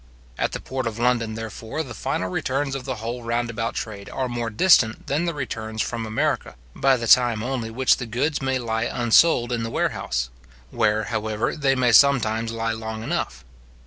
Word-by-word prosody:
At - - 0
the - - -3
port 130 -2 -4
of 110 -1 -4
London, 115 -2 +1
therefore, 115 +6 -5
the 125 -5 -8
final 95 -3 -2
returns 135 +8 -1
of 135 -2 -5
the 130 -2 -3
whole 115 +2 -5
round 115 0 -1
about 115 0 -3
trade 100 -3 -5
are 130 - -2
more 120 -1 -3
distant 115 - +4
than 150 +5 0
the 170 - -1
returns 110 -5 -5
from 115 0 -2
America, 110 0 -1 0.2
by 135 -1 +3
the 115 - -4
time 115 -1 +5
only 125 -3 -2
which 130 +3 +3
the 125 - -5
goods 125 +7 -1
may 135 -1 0
lie 115 -2 -1
unsold 120 +1 +3
in 120 -1 -1
the 115 - -3
warehouse; - - -1 0.4
where, 110 0 +1
however, 110 0 -1
they 140 -3 +2
may 125 -2 +3
sometimes 115 -3 +4
lie 115 0 -2
long 110 0 -5
enough. 65 - -3
115 Hz, 190 wpm, -23 LUFS, 110-130 Hz, 0.4 s, time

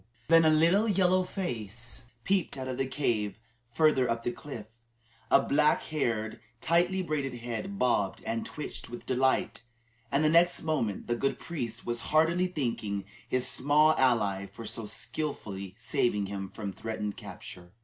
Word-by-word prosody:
Then 165 -1 +7
a - - +7
little 170 +8 +4
yellow 185 -2 +3
face 120 - -5 0.2
peeped 195 -7 +1
out 130 0 -4
of 130 -1 -4
a 135 - +1
cave 115 -7 -1 0.3
farther 135 -2 +3
up 115 0 -1
the 120 - 0
cliff, 130 -6 -8 0.6
a - - +7
black 150 +1 +3
haired, 115 -8 -2 0.2
tightly 175 +6 +2
braided 140 -6 -2
head 120 - -5
bobbed 105 - +1
and 115 0 -2
twitched 150 - -6
with 120 - -8
delight, 130 +1 +1 0.5
and 140 +2 +2
the - - +5
next 170 +2 +4
moment 135 -11 -1
the 120 - 0
good 135 +3 0
priest 120 -9 -5
was 120 0 0
heartily 165 +4 +3
thanking 115 - -2 0.2
his 130 0 +2
small 150 +3 +4
ally 105 -7 +2
for 115 - -10
so 110 0 -4
skilfully 100 -11 -4
saving 120 -4 0
him 95 -1 -5
from 100 -2 -6
threatened 105 0 -4
capture. 90 -3 -9
125 Hz, 155 wpm, -29 LUFS, 110-155 Hz, 0.6 s, Then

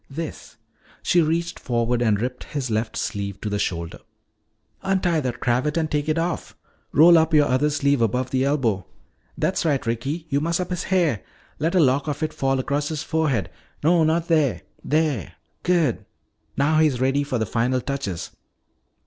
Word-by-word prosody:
"This," 160 +3 -7 0.5
she 175 - +4
reached 165 +2 -1
forward 120 0 0
and 110 -4 +2
ripped 125 +2 -4
his 135 -5 -4
left 110 +1 -1
sleeve 100 -1 -3
to 105 - -3
the 105 - -1
shoulder. 85 -4 -3 0.8
"Untie 185 -4 +1
that 125 -4 -3
cravat 125 +6 0
and 160 -2 -1
take 150 +1 0
it 155 - +1
off. 170 +1 -3 0.3
Roll 165 +3 +7
up 160 0 +2
your 150 -1 +6
other 130 +4 +2
sleeve 140 -3 +1
above 125 +3 0
the 130 0 +1
elbow. 125 - 0 0.5
That's - - 0
right. 145 -6 0
Ricky, 135 +8 -2
you 140 0 +1
muss 165 +2 0
up 180 0 -3
his 180 - -2
hair. 170 - +1 0.4
Let 165 +5 0
a - - +5
lock 140 -1 +3
of 145 +1 -2
it 155 - -2
fall 135 0 0
across 140 +3 -1
his 155 -2 -3
forehead. 150 -10 0 0.3
No, 165 +1 +4
not 160 +2 +1
there 155 -6 +2 0.2
there. 150 - 0 0.3
Good. 170 -9 +1 0.5
Now 155 +3 +3
he's 150 -6 +3
ready 135 +2 +2
for 140 -3 -2
the 110 - 0
final 125 +4 0
touches." 125 -10 -4
145 Hz, 175 wpm, -23 LUFS, 125-160 Hz, 0.8 s, Roll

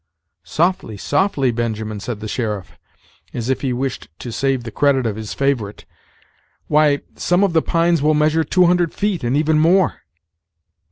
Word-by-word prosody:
"Softly, 160 - 0
softly, 140 - +1
Benjamin," 110 -2 -3
said 105 0 -6
the 110 - -5
sheriff, 105 -5 -3 0.6
as 120 +2 -2
if 130 - -1
he 135 - -1
wished 130 +1 -3
to 120 - -7
save 135 +1 -1
the 115 - -7
credit 140 -2 +2
of 110 -3 -1
his 110 -1 -6
favorite; 125 -7 -1 0.8
"why, 150 -1 +3 0.2
some 180 +2 +2
of 195 -4 +1
the 160 - +4
pines 170 -1 +1
will 155 +1 +3
measure 155 +2 +2
two 180 +2 +3
hundred 175 -1 +2
feet, 205 -6 -1
and 120 +4 +1
even 155 0 +2
more." 175 +3 +3
140 Hz, 165 wpm, -19 LUFS, 115-165 Hz, 0.8 s, the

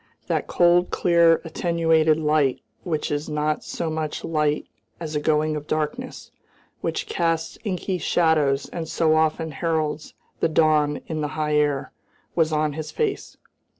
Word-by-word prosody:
That - - -1
cold, 175 0 +3
clear, 170 -1 +4
attenuated 160 -1 +2
light 150 -4 +1 0.2
which 155 -5 -2
is 145 +1 -2
not 150 0 -1
so 170 - -4
much 155 -1 -3
light 150 -2 0 0.3
as 160 -2 -5
a - - +2
going 155 0 +1
of 150 0 -6
darkness, 155 -1 -3 0.5
which - - -2
casts 165 -1 -1
inky 185 -2 -2
shadows 150 -4 +2
and 165 -2 -5
so 160 -2 +2
often 160 0 +1
heralds 155 0 -2 0.2
the - - +2
dawn 155 -2 +2
in 155 -2 -3
the 150 - 0
high 150 -1 0
air, 145 -2 +1 0.4
was 160 -2 +2
on 155 -1 +1
his 155 +1 -5
face. 435 -3 -3
155 Hz, 150 wpm, -23 LUFS, 150-165 Hz, 0.5 s, clear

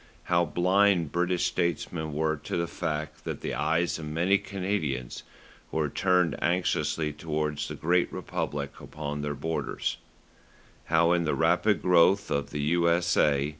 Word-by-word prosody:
How 85 -1 +2
blind 90 -1 +2
British 90 0 +1
statesmen 85 -2 -1
were 80 +1 0
to 75 - -4
the 85 - 0
fact 75 -3 -4
that - - -5
the - - -3
eyes 80 +4 0
of 75 - -6
many 90 +6 +2
Canadians 90 -10 -3 0.5
were 80 -2 0
turned 90 -1 +2
anxiously 85 -3 0
towards 75 -1 -2
the - - -6
great 90 +2 +1
republic 70 -1 -4
upon 75 -1 -5
their 75 0 -3
borders; 80 +3 -3 0.9
how 85 +1 +3
in 85 -1 +2
the 75 - +1
rapid - - +2
growth 90 +2 +4
of 70 0 -1
the 75 - -3
U.S.A. 85 -3 +2
80 Hz, 140 wpm, -28 LUFS, 75-90 Hz, 0.9 s, growth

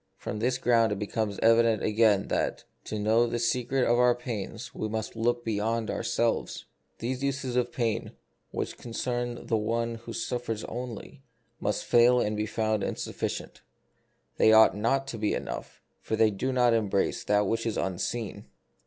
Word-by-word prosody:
From 105 - -5
this 125 +3 +1
ground 115 -3 +3
it 105 - -1
becomes 105 0 -2
evident 115 -2 +4
again 105 -2 +3
that, - - -1 0.2
to 110 - -4
know 110 +3 +3
the 120 - -2
secret 125 +2 +1
of 120 +1 +3
our 125 -1 +5
pains, 115 -1 -6
we 110 - -3
must 110 +1 -4
look 120 +1 0
beyond 110 +1 -1
ourselves. 115 -1 -1 0.3
These 125 +3 -3
uses 135 -2 -2
of 125 -1 +1
pain, 115 -2 -2 0.4
which - - -4
concern 120 0 -3
the 115 - +1
one 115 +2 -1
who 115 - -7
suffers 115 -1 -3
only, 120 -1 -7 0.4
must - - -1
fail 120 +1 +5
and 105 -2 0
be 105 +1 -1
found 110 -1 0
insuf - - -3
ficient; - - -4 0.8
they 110 - +6
ought 110 -2 +7
not 125 +6 +1
to 115 - -5
be 105 - +1
enough, - - -6 0.2
for 110 - -2
they 110 -1 +4
do 125 +7 -2
not 125 -2 +3
embrace 105 -4 0
that 105 0 +2
which 115 +3 -1
is 110 - -2
unseen. 100 +4 -3
115 Hz, 170 wpm, -28 LUFS, 110-120 Hz, 0.8 s, ought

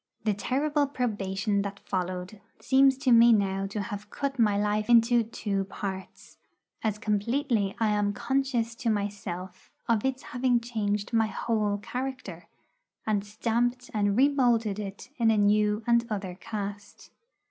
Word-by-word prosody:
The 215 -1 +2
terrible 285 +7 0
probation 205 -5 -1
that 200 0 -5
followed 185 +1 -4 0.2
seems 270 0 +4
to 265 -2 +1
me 235 0 +8
now 195 -2 +1
to 205 +2 -5
have 205 -2 -7
cut 275 +1 -3
my 210 -3 +3
life 210 +2 0
into 235 0 +5
two 205 -3 -3
parts, 190 -1 -7 0.4
as 215 -2 0
completely 215 0 0
as - - -27
I 220 - +3
am 205 -1 +1
conscious 240 0 -1
to 240 -2 -1
myself 195 -3 -4 0.2
of 225 -3 +2
its 265 0 -1
having 250 -1 +1
changed 210 -3 -2
my 225 -1 +3
whole 215 -1 -1
character, 245 -5 -6 0.6
and 210 -2 0
stamped 235 +4 -1
and 205 -1 +1
remoulded 240 -7 +3
it 200 +4 -7
in 230 -3 +3
a 220 - +3
new 210 +1 +2
and 235 0 +3
other 195 -4 -3
cast. 205 +1 -7
215 Hz, 145 wpm, -28 LUFS, 205-240 Hz, 0.6 s, me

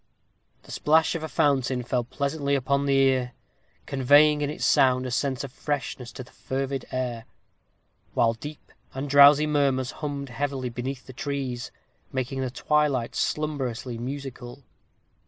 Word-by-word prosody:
The - - -8
plash 160 +2 +4
of 165 - -3
a 160 - -4
fountain 130 -4 +1
fell 125 0 -1
pleasantly 140 +3 -1
upon 140 +1 0
the 140 - +3
ear, 130 -2 +2 0.5
conveying 145 +3 +4
in 145 - 0
its 150 - -3
sound 130 -1 +4
a 125 - -4
sense 130 +1 -1
of 135 - -7
freshness 135 -4 -4
to 130 - -7
the 125 - -19
fervid 135 -1 -4
air; 120 -3 -3 0.9
while 115 -1 +3
deep 145 +6 -10 0.2
and 135 +2 -3
drowsy 145 +2 +7
murmurs 140 -4 +1
hummed 140 -2 -4
heavily 130 0 -3
beneath 125 +2 -5
the 130 - -11
trees, 130 -3 -4 0.4
making 130 +1 -2
the 130 - -1
twilight 140 -2 0
slumberously 130 -6 -2
musical. 130 0 -7
135 Hz, 145 wpm, -26 LUFS, 125-145 Hz, 0.9 s, drowsy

